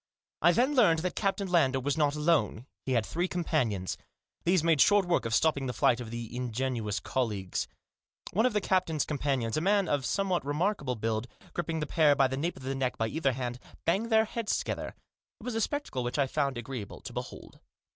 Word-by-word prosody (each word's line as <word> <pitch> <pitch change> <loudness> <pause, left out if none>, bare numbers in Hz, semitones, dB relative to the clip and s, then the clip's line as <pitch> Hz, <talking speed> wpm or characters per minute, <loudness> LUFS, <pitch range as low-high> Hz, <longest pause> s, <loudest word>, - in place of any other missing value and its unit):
I 175 - +6
then 250 - +2
learned 170 - +4
that 180 - -2
Captain 195 -1 0
Lander 140 -7 +3
was 140 +1 -1
not 150 -2 +2
alone. 150 -6 +1 0.2
He 130 - +1
had 115 -3 +2
three 175 +8 -1
companions. 125 - -1 0.5
These 175 -1 +3
made 165 -4 +4
short 205 -2 +5
work 175 -7 +1
of 115 0 +1
stopping 140 -3 +2
the 125 - -2
flight 120 +1 +3
of 120 -2 -6
the 115 0 -6
ingenuous 120 -3 -2
colleagues. 105 -8 -2 0.7
One 220 +6 +4
of 250 - -2
the 210 - +1
captain's 180 -6 +1
companions, 135 -6 -1
a - - +1
man 200 +1 +3
of 145 -3 0
somewhat 190 -5 0
remarkable 145 -2 -1
build, 110 +1 -2 0.3
gripping 165 -2 -2
the - - 0
pair 150 -1 +4
by 135 -1 +4
the 130 - -3
nape 165 +6 -2
of - - -11
the 135 +1 -2
neck 135 -2 -1
by 110 0 0
either 140 -2 0
hand, 125 -1 -4 0.3
banged 205 +7 +1
their 220 -1 +4
heads 225 0 -1
together. - - -4 0.4
It - - -14
was 250 0 -3
a 225 - 0
spectacle 285 - -2
which 120 +3 -3
I 140 - +3
found 140 -1 -1
agreeable 120 -3 -6
to - - -8
behold. - - -7
145 Hz, 205 wpm, -29 LUFS, 125-180 Hz, 0.7 s, I